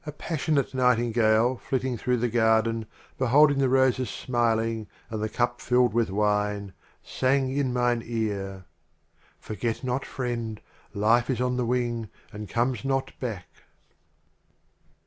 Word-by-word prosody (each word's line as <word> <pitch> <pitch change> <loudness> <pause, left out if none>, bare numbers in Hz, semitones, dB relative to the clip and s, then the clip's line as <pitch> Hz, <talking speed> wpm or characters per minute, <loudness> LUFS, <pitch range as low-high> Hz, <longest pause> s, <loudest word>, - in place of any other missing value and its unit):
A 155 - -6
passionate 150 -2 -1
Nightingale 120 -1 +3
flitting 130 0 -2
through 125 +2 0
the 120 +1 0
Garden, 110 -1 +2 0.3
Beholding 140 +3 +5
the 135 -2 +3
Roses 130 -2 +2
smiling 115 -3 -1 0.2
and 110 -1 -3
the 110 - -1
Cup 120 +2 -1
filled 125 -2 +2
with 115 -2 +1
Wine, 105 -1 0 0.3
Sang 130 0 0
in 140 -3 0
mine 120 -1 +1
Ear, 100 -5 -3 0.7
"Forget 115 +3 -4
not, 130 +1 -1
Friend, 115 -4 -4 0.4
Life 115 +5 +3
is 130 - 0
on 125 0 0
the 125 - 0
Wing 120 -3 -1 0.2
and 105 0 -7
comes 120 0 0
not 135 -1 -1
back." 110 -8 -4
120 Hz, 130 wpm, -26 LUFS, 110-130 Hz, 0.7 s, Beholding